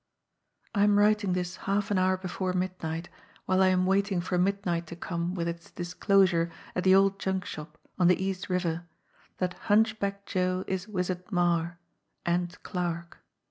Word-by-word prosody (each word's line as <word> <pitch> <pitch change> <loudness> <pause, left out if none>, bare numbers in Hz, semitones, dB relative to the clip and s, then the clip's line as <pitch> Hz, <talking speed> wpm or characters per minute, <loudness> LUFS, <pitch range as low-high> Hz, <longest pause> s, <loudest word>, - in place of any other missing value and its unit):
"I 200 -2 +3
am 205 0 +5
writing 205 -2 +3
this 180 0 -2
half 205 +2 +1
an 195 - +3
hour 185 0 +3
before 185 0 -3
midnight, 175 -2 -3 0.4
while 185 0 +2
I 190 - +6
am 185 0 +3
waiting 195 0 +2
for 180 +1 -2
midnight 180 -3 0
to 170 - -7
come 170 +1 -3
with 170 -2 -1
its 170 0 -5
disclosure 180 -1 +2 0.3
at 180 - 0
the 190 0 +7
old 195 0 +4
junk 190 -1 -1
shop 155 +1 -8 0.2
on 180 - +5
the 180 - +4
East 190 0 -3
River 175 -2 -1 0.5
that 180 -1 -1 0.2
Hunchback 205 -2 +2
Joe 185 0 0
is 190 +1 -3
Wizard 180 -2 -3
Marre 175 -1 +1 0.5
and 175 +1 0
Clarke. 170 -2 -3
185 Hz, 165 wpm, -28 LUFS, 175-195 Hz, 0.5 s, the